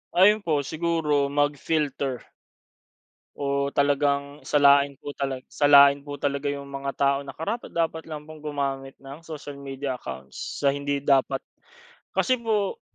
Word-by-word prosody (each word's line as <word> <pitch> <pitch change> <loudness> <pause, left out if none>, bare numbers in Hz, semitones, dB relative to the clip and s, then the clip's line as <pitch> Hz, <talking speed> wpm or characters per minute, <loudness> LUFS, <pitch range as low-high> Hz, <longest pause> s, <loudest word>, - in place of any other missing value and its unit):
Ayun 205 +4 +6
po. 150 -5 +1
Siguro 155 -2 0
mag-filter 145 -2 -1 1.1
o 140 0 -1
talagang 140 0 +1
salain 140 -1 +5
po 145 - -6
tala 135 -2 -2
salain 140 -1 +7
po 145 -1 -5
talaga 140 0 -1
iyong 140 0 -3
mga 140 0 -4
tao 140 0 +2
na 135 - -8
karapat-dapat 165 - -2
lang 155 -2 -6
pong 155 0 -10
gumamit 135 -2 -3
ng 135 +2 -10
social 145 -3 -8
media 135 -1 -4
accounts 65 0 -7
sa 140 - +4
hindi 140 0 -2
dapat. 135 -1 +2 0.7
Kasi 255 - +2
po 220 - 0
140 Hz, 135 wpm, -25 LUFS, 140-150 Hz, 1.1 s, salain